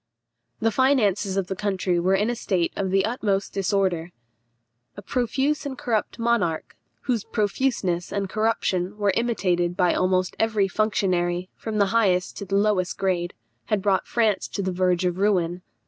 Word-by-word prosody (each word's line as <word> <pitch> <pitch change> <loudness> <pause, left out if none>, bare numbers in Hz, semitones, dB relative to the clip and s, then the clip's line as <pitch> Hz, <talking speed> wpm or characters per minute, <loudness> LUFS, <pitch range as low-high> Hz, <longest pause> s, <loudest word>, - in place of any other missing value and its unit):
The 225 - +2
finances 210 -6 +2
of 195 - +1
the 190 - -4
country 190 -3 0
were 185 +3 +2
in 210 +4 +1
a - - -2
state 185 -7 -1
of 195 -1 -1
the 195 +1 +2
utmost 210 -4 -1
disorder. 190 -3 0 0.9
A 205 - -8
profuse 265 +6 0
and 270 -2 -5
corrupt 225 -4 -1
monarch, 230 -9 0 0.3
whose 240 -6 -1
profuseness 205 -5 -1
and 200 -1 -1
corruption 205 -2 -1
were 205 -2 +1
imitated 180 -7 0
by 180 -2 +3
almost 185 0 +1
every 220 -3 +2
functionary, 185 -4 0
from 220 -1 -4
the 200 - +4
highest 185 -6 +2
to 200 - -5
the 195 +1 -2
lowest 200 -3 +1
grade, 175 -2 -1 0.3
had 210 -3 -1
brought 195 -2 +1
France 220 -4 +1
to 200 - -4
the 185 - -1
verge 180 0 +1
of 180 0 -1
ruin. 180 -4 +1
195 Hz, 160 wpm, -24 LUFS, 180-220 Hz, 0.9 s, the